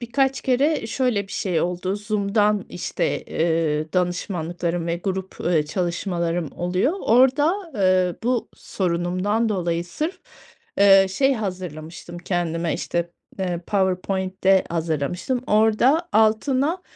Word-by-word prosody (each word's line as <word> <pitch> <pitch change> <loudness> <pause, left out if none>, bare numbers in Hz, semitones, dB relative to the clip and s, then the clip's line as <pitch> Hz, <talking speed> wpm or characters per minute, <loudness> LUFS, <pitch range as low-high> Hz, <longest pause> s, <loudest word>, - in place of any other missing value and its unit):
birkaç 270 +3 0
kere 270 0 +1
şöyle 225 -4 0
bir - - -10
şey 180 -5 -1
oldu: 180 +3 -2
Zoom’dan, 210 -1 +1
işte, 175 - -2
eee, 160 -2 0
danışmanlıklarım 175 -1 -2
ve 170 - -1
grup, 190 +1 -4
eee, 160 -4 +2
çalışmalarım 170 0 -2
oluyor. 180 - 0
Orada, 290 - +3
eee, 185 -3 +2
bu 245 0 0
sorunumdan 185 +5 -1
dolayı 175 -4 -1
sırf, 310 - -4 0.6
eee, 195 -1 +7
şey 270 +7 +2
hazırlamıştım 175 - -6
kendime, 170 -2 -1
işte, 170 0 -2 0.3
eee, 180 -2 -1
PowerPoint’te 190 0 +1
hazırlamıştım. 170 - -2
Orada 225 +10 +3
altına, 260 +10 +2
190 Hz, 110 wpm, -23 LUFS, 175-225 Hz, 0.6 s, eee